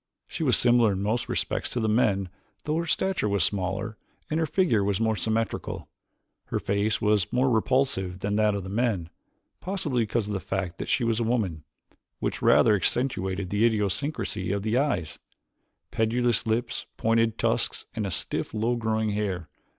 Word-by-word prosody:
She - - -7
was - - +4
similar 120 -3 +4
in 95 +1 -3
most 110 +3 -1
respects - - -1
to 125 - -2
the 110 - 0
men 100 -4 +2 0.3
though 155 +1 -1
her 170 0 -2
stature 190 - +1
was 100 -4 +2
smaller 100 +4 -1 0.3
and 155 - +1
her 160 - +1
figure 150 - +2 0.2
more 110 -1 +1
symmetrical. 110 +3 -2 0.6
Her - - -2
face 100 +2 0
was 105 -4 +2
more 130 +1 +2
repulsive 110 -6 +1
than 100 0 -1
that 105 -1 +3
of 100 - -3
the 95 - -7
men, 100 -6 -1 0.5
possibly 175 -10 -1
because 110 0 0
of 105 - -4
the 100 - -1
fact 95 -1 -3
that - - -4
she 125 - +2
was 115 -1 +1
a - - +1
woman, 105 -10 -1 0.5
which - - -3
rather 110 - +5
accentuated 95 -4 -1
the 105 +2 +2
idiosyncrasies 105 - 0
of 100 +1 -2
eyes, 110 - 0 0.7
pendulous 115 +1 +1
lip, 120 +2 0 0.3
pointed 115 0 +2
tusks - - 0
and 105 -4 -2
stiff, - - -2
low 115 +3 +1
growing 110 -2 0
hair. 95 -6 -2
110 Hz, 165 wpm, -26 LUFS, 100-120 Hz, 0.7 s, rather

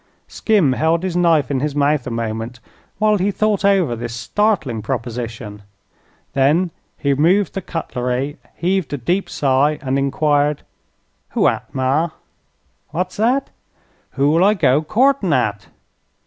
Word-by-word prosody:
Skim 195 - +2
held 160 +5 +1
his 185 -2 -2
knife 165 -6 +3
in 135 - 0
his 145 +1 -2
mouth 145 -2 +1
a - - -2
moment 115 +1 -4 0.4
while 215 -1 +2
he 190 +3 +1
thought 210 0 0
over 190 -11 +3
this 115 0 -5
startling 130 - 0
proposition. 115 -3 -5 0.7
Then 155 +6 +2 0.3
he 140 -1 +1
removed 175 +8 +2
the 195 - -3
cutlery, 130 -4 -3 0.2
heaved 180 -4 -1
a - - -1
deep 175 +10 -1
sigh, 140 +2 +2
and 135 0 -1
enquired: 145 +1 +1 0.7
"Who - - +4
at, - - -2
ma?" 135 +6 +1 0.8
"What's 180 +4 -3
that?" 250 +6 +1 0.6
"Who'll 150 +5 +3
I 210 +2 +4
go 145 -6 +3
courtin' 220 - +2
at?" 105 -6 0
145 Hz, 135 wpm, -19 LUFS, 130-185 Hz, 0.8 s, Who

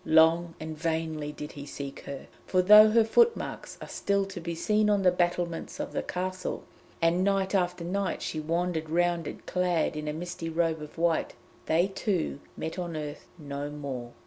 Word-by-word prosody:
Long 165 +1 +4
and 155 0 -5
vainly 160 -2 -2
did 150 0 -7
he 140 0 -9
seek 140 -1 -6
her, 140 -1 -6 0.2
for 185 -1 +3
though 210 +3 +9
her 225 +1 +5
footmarks 460 - +1
are - - -8
still 200 -1 0
to 195 -2 -7
be 170 0 -4
seen 210 +5 +2
on 205 -2 +3
the 180 - +6
battlements 175 -1 -1
of - - -4
the - - 0
Castle, 185 0 -3 0.4
and 170 +2 +3
night 195 0 +1
after 180 -2 +1
night 195 +3 -2
she 155 - -3
wandered 165 0 -1
round 170 -1 +1
it - - -8
clad 180 -4 +1
in 150 0 -4
a 150 - -1
misty 175 +1 -5
robe 165 -1 0
of 150 +1 -10
white, 165 -1 +1 0.3
they 165 +3 +4
two 190 -6 -1 0.2
met 160 +3 -4
on 170 -3 -3
earth 150 -1 -6
no 145 -2 -5
more. 135 -5 -6
170 Hz, 185 wpm, -28 LUFS, 155-185 Hz, 0.4 s, though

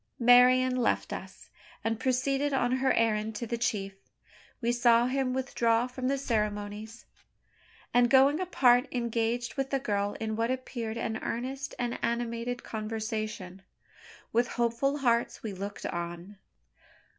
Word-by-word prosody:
Marian 250 +1 +6
left 245 - 0
us, - - -9 0.3
and 225 0 -1
proceeded 270 +3 0
on 245 -2 +1
her 265 0 +2
errand 220 -1 +1
to 235 - -3
the 235 - -2
chief. 205 -4 -2 0.7
We 235 -1 0
saw 240 -1 +4
him 260 0 0
withdraw 240 -3 +1
from 255 0 -4
the 275 +1 +1
ceremonies, 210 -2 -3 0.9
and, 245 0 +4
going 275 +4 +5
apart, 260 -8 +3
engage 235 0 -1
with 270 0 -2
the 275 - +1
girl 205 -6 -1
in 220 -1 -2
what 230 +1 0
appeared 240 -3 -4
an 225 -1 -2
earnest 265 +4 -4
and 240 -1 -2
animated 235 +1 -2
conversation. 215 -3 -4 0.7
With 240 +2 +3
hopeful 240 +4 0
hearts 240 -4 0
we 215 -3 -4
looked 200 +2 -6
on. 175 +3 -5
235 Hz, 135 wpm, -29 LUFS, 220-255 Hz, 0.9 s, Marian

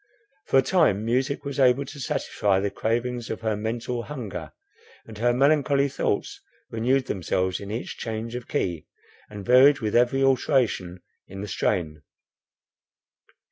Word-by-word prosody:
For - - +3
a 135 - +5
time 130 - +2
music 135 +5 -1
was 140 -1 -4
able 130 +1 +4
to 145 - -10
satisfy 100 -6 0
the 100 0 -1
cravings 120 +1 -2
of 110 - -4
her 110 -1 0
mental 115 +3 -3
hunger, 105 - -7 0.5
and 110 -2 -11
her 120 +2 +3
melancholy 140 +2 +3
thoughts - - -2 0.3
renewed 125 +4 +1
themselves 95 -1 -1
in 100 - -8
each 115 +4 -5
change 115 0 -4
of 125 -1 -6
key, 85 -4 -2 0.4
and 105 -2 -8
varied 130 +3 +6
with 110 -2 -2
every 125 +3 +3
alteration 125 -9 +1 0.2
in 95 0 -8
the 105 - -5
strain. 80 -6 -1
120 Hz, 145 wpm, -25 LUFS, 105-135 Hz, 0.5 s, varied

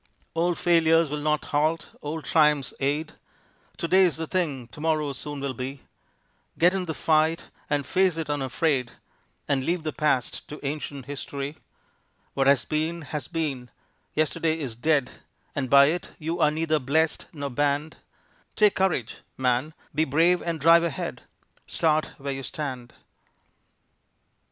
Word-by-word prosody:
Old 170 +1 +1
failures 165 -2 +4
will 150 - -2
not 150 0 0
halt, 155 +3 +1
old 155 +1 -5
triumphs 150 -4 +3
aid, 145 +3 -1 0.6
To 170 - -2
day's 185 -1 +4
the 160 - -3
thing, 150 -9 -2
to 150 - -11
morrow 155 -3 +1
soon 145 +2 -6
will 140 -1 -2
be; 130 +2 -6 0.7
Get 175 +2 +5
in 190 -1 -1
the 160 -3 -4
fight 160 +1 +1 0.2
and 145 -2 0
face 185 +2 +2
it 160 -3 -3
unafraid, 135 -2 0 0.5
And 135 -2 +1
leave 170 +2 -1
the 155 - -3
past 150 -6 0
to 150 - -8
ancient 140 -2 -4
history; 140 +1 -5 0.8
What 135 -1 +1
has 140 -2 +4
been, 160 +2 -1
has 150 +1 -5
been; 145 -7 -3 0.5
yesterday 155 +1 +1
is 135 -7 -4
dead 140 +1 +1 0.4
And 130 -3 -2
by 140 +1 +8
it 165 +5 -1
you 165 +2 -3
are 155 -2 +5
neither 155 0 0
blessed 155 +4 0
nor 145 -3 -5
banned, 145 +3 0 0.6
Take 210 -2 +5
courage, 185 - 0 0.2
man, 130 +4 0 0.2
be 155 +2 +2
brave 165 +5 +3
and 165 -2 -3
drive 165 +3 +6
ahead, 165 -5 -3 0.5
Start 155 -2 +1
where 140 0 -4
you 135 - -5
stand. 130 -4 -5
150 Hz, 150 wpm, -26 LUFS, 140-165 Hz, 0.8 s, by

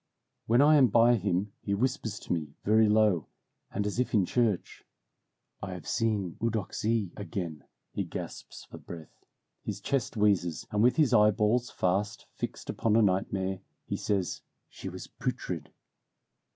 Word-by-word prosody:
When 120 +5 +5
I 150 +1 +6
am 135 -3 +6
by 115 +2 +5
him 100 -2 0
he 100 - -1
whispers 120 -2 -1
to - - -2
me, 75 -4 -4
very 110 +1 +5
low, 105 -6 +3 0.4
and 100 0 -2
as 105 +3 -2
if 125 - 0
in 100 -3 +4
church, 115 -3 0 0.8
"I 95 -2 -5
have 90 -4 -9
seen 105 -6 0
Eudoxie 110 -2 -1
again." 90 -8 -5 0.3
He - - -1
gasps - - -7
for - - -11
breath, 80 -3 -11 0.4
his - - -4
chest 135 -5 -1
wheezes, 90 - +2
and 105 - +1
with 125 +2 +5
his 150 -6 +3
eyeballs 105 +2 +4
fast 100 +4 -1
fixed - - -5
upon 110 -1 +1
a 115 - +5
nightmare, 95 -1 0 0.3
he - - -3
says, 95 -4 -1 0.3
"She - - -7
was - - -8
putrid." - - -4
105 Hz, 150 wpm, -29 LUFS, 95-115 Hz, 0.8 s, I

